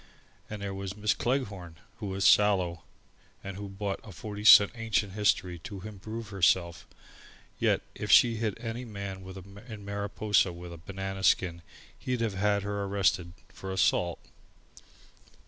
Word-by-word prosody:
And 105 -1 -6
there 100 -1 -3
was 95 0 -6
Miss 105 +1 +2
Cleghorn, 100 -10 -2 0.2
who 105 - -5
was 95 0 -2
sallow, 95 -5 +4 0.6
and 100 -1 -6
who 100 0 -7
bought 100 0 -4
a 110 - -11
forty 105 +4 -7
cent 105 -1 +9
Ancient 110 -4 -1
History 95 -4 +1
to 95 +3 -8
improve 110 +2 -7
herself: 85 -3 +1
and - - -26 0.6
yet - - +2
if - - -6
she'd 115 -2 +6
hit 110 -2 -2
any 115 +1 -5
man 100 -4 -6 0.5
in 105 -4 -9
Mariposa 100 -1 +1
with 85 0 -9
a - - -9
banana 95 +3 -6
skin, 85 -1 +2 0.4
he'd 125 -2 -2
have 115 -3 0
had 100 +1 +1
her 100 0 -3
arrested 95 -3 0 0.2
for 95 - -7
assault. 90 -2 +1
100 Hz, 150 wpm, -29 LUFS, 95-105 Hz, 0.6 s, cent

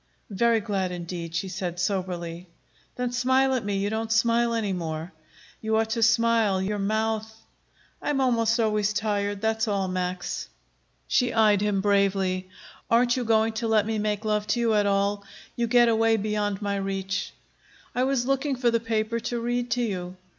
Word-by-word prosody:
"Very 230 +3 +2
glad, 195 -4 -2
indeed," 170 -1 -6
she 190 +3 -1
said 180 -2 -4
soberly. 180 -2 -3 0.5
"Then 250 -1 -2
smile 260 +2 +2
at 255 - -1
me. 200 -1 -1
You 200 +1 -1
don't 220 0 -2
smile 235 +1 +3
any 210 -4 -1
more. 165 -1 -4 0.5
You 220 0 +1
ought 220 0 0
to 230 0 -1
smile; 225 -3 +3
your 205 +2 -2
mouth 220 +2 -1 0.4
" - - -35
"I - - -3
am 290 -2 +1
almost 230 -3 +2
always 215 -2 +1
tired; 205 -1 -1
that's 220 +1 0
all, 200 -2 0
Max." 185 0 -3 0.6
She 250 -3 +2
eyed 210 -3 +4
him 205 -2 +1
bravely. 195 -2 +1 0.4
"Aren't 240 +1 +4
you 255 - -1
going 225 -1 +2
to 230 - -1
let 215 -2 +3
me 220 0 -1
make 210 0 -2
love 210 -1 0
to 225 +3 +1
you 230 -2 +2
at 205 -1 +3
all? 200 0 +1 0.3
You 235 -1 0
get 240 0 +5
away 225 0 +3
beyond 210 -1 -2
my 200 0 -1
reach." 195 0 -3 0.6
"I 250 +1 +1
was 265 -2 0
looking 275 +1 0
for 245 -1 +1
the 230 - +2
paper 225 0 -1
to 240 +1 -3
read 240 +1 -1
to 245 +1 0
you." 185 -4 -4
215 Hz, 185 wpm, -26 LUFS, 195-230 Hz, 0.6 s, get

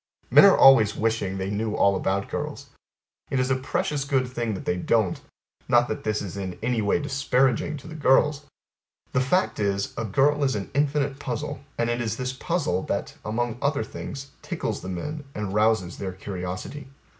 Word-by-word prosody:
Men - - +9
are 195 - +7
always 115 -6 +7
wishing 110 -4 -1
they 95 +1 -3
knew 105 +1 -1
all 100 0 +4
about 95 +1 -1
girls. - - -5 0.6
It 135 - 0
is 130 +1 +1
a - - +4
precious 135 +2 -1
good 135 -2 +1
thing 120 -4 -3
that - - -7
they 90 - +1
don't. 95 +1 +1 0.5
Not 120 0 +4
that 110 - -4
this 105 -1 -1
is 95 -2 -6
in 95 -2 -5
any 120 -1 +1
way 100 - +2
disparaging 135 0 +1
to 145 - -12
the 160 - -8
girls. 145 0 +3 0.7
The 130 - +3
fact 180 +9 +1
is 100 -1 -1
A - - -1
girl 145 +7 +2
is 130 -4 +1
an 100 -2 -5
infinite 145 -1 0
puzzle, 125 -5 -4 0.2
and 115 - +1
it 120 0 -1
is 115 -1 -2
this 130 0 -3
puzzle, 140 - -1
that, - - -2
among 120 +2 -2
other 140 0 +1
things, 135 0 -7
tickles - - -3
the 90 - -6
men, 150 - -4
and 105 -2 -3
rouses 105 -4 +1
their 95 -2 -4
curiosity. 95 +8 -6
120 Hz, 190 wpm, -25 LUFS, 100-135 Hz, 0.7 s, Men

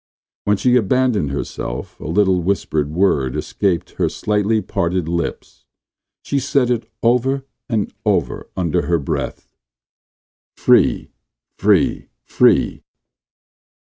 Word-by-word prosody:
When 105 0 +2
she 125 +4 +3
abandoned 120 - +1
herself 70 -3 -5
a - - -7
little 95 +2 +2
whispered 80 -5 -1
word 75 -7 +1
escaped 95 -5 -1
her - - +1
slightly 105 +1 0
parted 90 -4 -1
lips. 85 0 -4 0.6
She 140 - 0
said 135 -2 +1
it 120 -2 -2
over 130 +3 +2 0.2
and 110 -4 -1
over - - -1
under 90 -1 0
her 85 0 +2
breath: 70 - -4 1.0
"free, - - +3 0.5
free, - - +2 0.2
free!" - - +2
100 Hz, 105 wpm, -19 LUFS, 85-120 Hz, 1.0 s, she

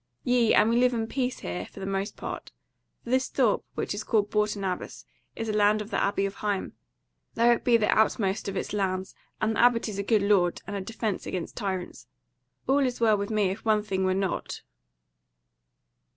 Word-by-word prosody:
Yea, 245 -3 +3
and 220 - +5
we 235 - +3
live 250 0 +3
in 225 -1 -1
peace 255 +2 -2
here 90 +1 -4
for - - -13
the 190 - -5
most 195 +1 -3
part; - - -6 0.5
for 240 - -7
this 260 0 +2
thorp, 245 -6 +2
which - - -2
is 205 - -4
called 210 -2 +1
Bourton 210 -1 0
Abbas, 185 -2 -4 0.3
is 225 - -4
a 215 - -1
land 210 0 +4
of 210 +1 -7
the - - +1
Abbey 200 0 +1
of 195 0 -5
Higham; 205 -2 -2 0.6
though 235 +1 +5
it 235 - +1
be 240 -2 +5
the 215 - +1
outermost 210 -2 +1
of 195 -1 -3
its - - -3
lands 190 -2 -1 0.3
and 220 0 0
the - - -2
Abbot 240 -1 +4
is 205 -2 -5
a - - -1
good 210 -1 +2
lord 195 -4 +3
and 200 - -5
a 200 - -2
defence 220 0 -3
against 180 -3 -4
tyrants. 190 -5 -4 0.6
All 275 +2 +3
is 255 -3 0
well 225 -2 +4
with 200 0 -3
me 210 -4 +1
if 195 - -7
one 215 -2 +2
thing 190 -3 -1
were 185 0 +2
not." 195 -1 -3
210 Hz, 210 wpm, -27 LUFS, 195-230 Hz, 0.6 s, and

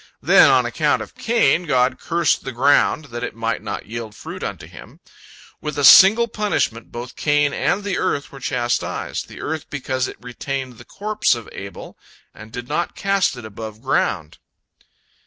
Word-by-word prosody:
Then, - - +7
on - - +4
account - - 0
of - - -14
Cain, 225 -6 +1
God 130 -2 +2
cursed 170 -1 +1
the 135 - -5
ground, 140 +4 +3
that 120 0 -4
it 125 - -4
might 115 0 -2
not 100 - -5
yield 110 -1 -7
fruit - - -8
unto - - -5
him. - - -14 0.6
With 150 0 -5
a 145 - -1
single 205 - +8
punishment 210 - -2
both 120 +1 -7
Cain 145 -1 +1
and 205 - 0
the 200 -2 -2
earth 140 - -1
were 135 - -11
chastised, 120 -2 -2
the - - -11
earth 160 0 -4
because 130 -2 -2
it - - -9
retained 125 0 -5
the 120 - -13
corpse 210 -7 0
of 115 -2 -9
Abel, 100 0 -9 0.3
and 110 0 -13
did 125 +1 -7
not 160 +5 -2
cast 195 -8 +1
it 120 - -9
above 110 0 -8
ground. 85 - -1
130 Hz, 175 wpm, -21 LUFS, 120-165 Hz, 0.6 s, single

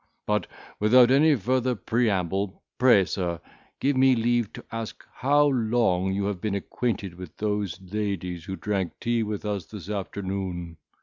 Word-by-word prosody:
But, 105 -3 0 0.3
without 120 +4 +6
any 150 +3 +5
further 125 +2 0
preamble, 100 -4 0 0.2
pray, 120 -7 +6
sir, 85 -3 -2 0.4
give 140 +1 +1
me 130 0 +5
leave 120 -1 +1
to - - -10
ask 115 -1 -6
how 145 +3 +3
long 115 -8 +2
you 100 +1 -1
have 100 -3 -2
been 105 -2 -1
acquainted 100 -2 -2
with 90 -1 -10
those 105 -4 -2
ladies 95 -3 -3
who 95 - -4
drank 95 -3 -2
tea 120 0 0
with 105 -1 -3
us 100 -5 -2
this 105 -2 -8
afternoon. 95 -4 -4
105 Hz, 150 wpm, -26 LUFS, 95-120 Hz, 0.4 s, without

